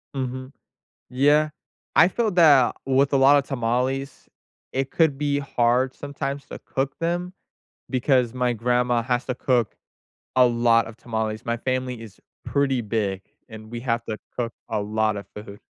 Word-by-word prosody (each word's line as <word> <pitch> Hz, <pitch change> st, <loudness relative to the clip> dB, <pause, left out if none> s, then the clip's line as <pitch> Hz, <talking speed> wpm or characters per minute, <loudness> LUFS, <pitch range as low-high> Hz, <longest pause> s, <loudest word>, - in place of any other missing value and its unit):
Mhm. 130 Hz, 0 st, -4 dB, 0.6 s
Yeah. 145 Hz, +4 st, +3 dB, 0.5 s
I 165 Hz, -, +7 dB
feel 220 Hz, +3 st, 0 dB
that, 150 Hz, -8 st, +5 dB
with 135 Hz, +1 st, +2 dB
a -, -, +4 dB
lot 135 Hz, +2 st, +6 dB
of 140 Hz, -, +2 dB
tamales, 130 Hz, +2 st, -2 dB, 0.4 s
it 135 Hz, 0 st, -2 dB
could 160 Hz, -5 st, +2 dB
be 145 Hz, 0 st, 0 dB
hard 130 Hz, -1 st, +1 dB
sometimes 140 Hz, -1 st, -5 dB
to -, -, -8 dB
cook 135 Hz, 0 st, -3 dB
them 175 Hz, +2 st, -2 dB, 0.6 s
because 125 Hz, -2 st, +2 dB
my 125 Hz, -1 st, 0 dB
grandma 120 Hz, +1 st, +1 dB
has 125 Hz, 0 st, -1 dB
to 125 Hz, -, -3 dB
cook 125 Hz, -5 st, 0 dB, 0.6 s
a 125 Hz, -, +6 dB
lot 115 Hz, -1 st, +3 dB
of 115 Hz, +1 st, -11 dB
tamales; 110 Hz, -1 st, -3 dB
my 115 Hz, 0 st, -1 dB
family 130 Hz, -1 st, -2 dB
is 110 Hz, -4 st, -12 dB, 0.2 s
pretty 135 Hz, -3 st, 0 dB
big, 100 Hz, -3 st, -2 dB, 0.3 s
and 110 Hz, -1 st, -11 dB
we 120 Hz, -, -4 dB
have 115 Hz, -2 st, -1 dB
to 110 Hz, -1 st, -4 dB, 0.2 s
cook 120 Hz, -2 st, -3 dB, 0.2 s
a 105 Hz, -, -1 dB
lotta 105 Hz, -1 st, -1 dB
food. 105 Hz, -1 st, -9 dB
125 Hz, 155 wpm, -24 LUFS, 115-135 Hz, 0.6 s, I